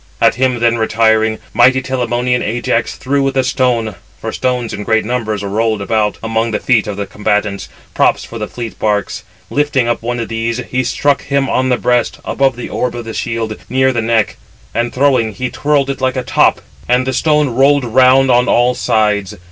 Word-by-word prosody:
At - - +4
him 125 -2 0
then, 115 0 +2
retiring, 110 0 +2 0.2
mighty 130 +2 +5
Telamonian 125 -1 -1
Ajax 115 +1 -1
[threw] 140 +2 0
with 135 0 -1
a 130 - +3
stone, 125 -4 0 0.3
for - - -4
[stones] 125 -2 -2
in 105 - -5
great 110 +1 +1
numbers 110 -4 -2
were 100 - -4
rolled 110 +1 0
about 105 +1 0
among 115 +1 0
the 105 - -2
feet 115 -5 +2
of 105 -2 -4
the 100 - -3
combatants, 105 0 -2 0.2
props - - +2
for 115 - -8
the 105 - -3
fleet 115 -2 -7
barks; 105 -1 -1 0.3
lifting 145 -4 +1
up 120 - -1
one 120 +1 -3
of 115 - -3
these, 115 +1 -2
he 130 0 +1
struck 140 +2 0
him 140 0 +1
upon 130 -1 0
the 125 - +2
breast, 120 +1 0
above 135 -3 +1
the 125 - -6
orb 125 -1 -2
of 120 -1 -6
the 115 - -6
shield, 115 -2 -3
near 130 0 +2
the 120 - 0
neck. 110 -1 0 0.4
And, 120 +1 -1
throwing, 130 -5 +2
he 125 +5 -4
twirled 140 0 +1
it 135 - -7
like 130 0 0
a 130 - -1
top, - - +2 0.3
and 125 +1 +3
it - - -8
(the 130 - -1
stone) 150 +1 +2
rolled 135 +2 +3
round 130 +2 +4
on 125 +1 +3
all 120 +1 +3
sides. 105 -4 0
120 Hz, 205 wpm, -15 LUFS, 110-130 Hz, 0.4 s, mighty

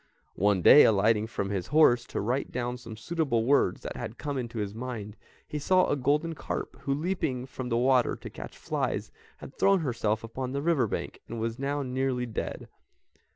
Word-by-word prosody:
One 100 -2 +3
day, 150 - +9
alighting 110 +1 +3
from 100 -3 -3
his 95 -3 -2
horse 125 -6 +4
to - - -4
write 125 +6 -1
down 125 0 -3
some 115 -3 -10
suitable 125 -2 0
words 140 +3 +2
that - - -6
had 115 - -6
come 145 -2 -4
into 120 -3 -4
his 105 -2 -3
mind, 110 -3 -6 0.3
he 150 - -4
saw 185 +5 +3
a - - +1
golden 150 +4 +1
carp - - -5
who, 140 0 -1
leaping 145 -6 -2
from 130 -1 -6
the 115 - +1
water 125 0 +3
to - - -9
catch - - -9
flies, - - -2 0.3
had - - -11
thrown 195 -2 +4
herself 115 -6 -1
upon 125 +3 -5
the 140 0 -2
river 155 -8 +2
bank, - - -5
and 115 - -6
was 115 +2 -3
now 140 +1 -1
nearly 130 -1 -1
dead. 115 - -5
125 Hz, 195 wpm, -28 LUFS, 115-140 Hz, 0.3 s, day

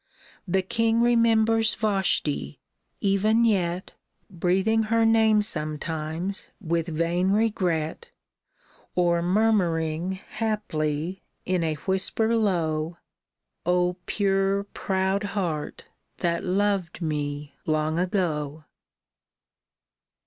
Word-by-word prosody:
The 190 +1 +1
king 230 +2 +1
remembers 225 -1 +3
Vashti, 190 - 0 0.4
even 210 +4 +3
yet 185 -4 0 0.4
Breathing 190 +5 +1
her 230 0 +3
name 220 -1 +4
sometimes 160 +2 -2
with 170 -3 -1
vain 170 +3 0
regret, 200 - 0 0.9
Or 175 -1 +2
murmuring, 175 -4 +1
haply, 190 -5 -3 0.2
in 180 -2 0
a 160 -1 0
whisper 195 +7 0
low, 170 -6 0 0.2
— - - -64
" - - -55
O 180 0 +1
pure, 195 -1 +1
proud 190 -1 -1 0.2
heart 155 -6 -3 0.3
that 170 -1 -1
loved 190 -2 0
me 145 -1 -3
long 155 +1 +1
ago 160 -5 -1
185 Hz, 90 wpm, -25 LUFS, 160-210 Hz, 0.9 s, name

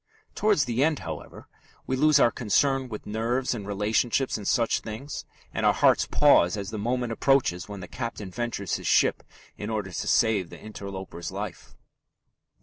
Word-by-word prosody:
Towards 210 -9 +2
the 125 +2 +1
end, 155 0 +2
however, - - -8 0.4
we 130 - -1
lose 150 +2 +5
our 120 - +5
concern 130 +3 +1
with 105 -2 -7
nerves 115 +5 -1
and 105 -4 -6
relationships 110 +6 +1
and 105 -3 -5
such 115 -3 +2
things, 115 +7 -7 0.3
and - - -2
our - - +4
hearts - - +4
pause 90 +4 +4
as 100 0 -5
the 110 - -4
moment 120 +2 -1
approaches 120 -9 +1
when 100 -2 -7
the 90 - -7
captain 110 -5 -5
ventures 120 -4 -2
his - - -6
ship - - +3 0.4
in 105 - -5
order 105 -4 -3
to - - -4
save 105 -6 +2
the - - -11
interloper's 95 -5 -7
life. - - -7
110 Hz, 170 wpm, -26 LUFS, 100-130 Hz, 0.4 s, lose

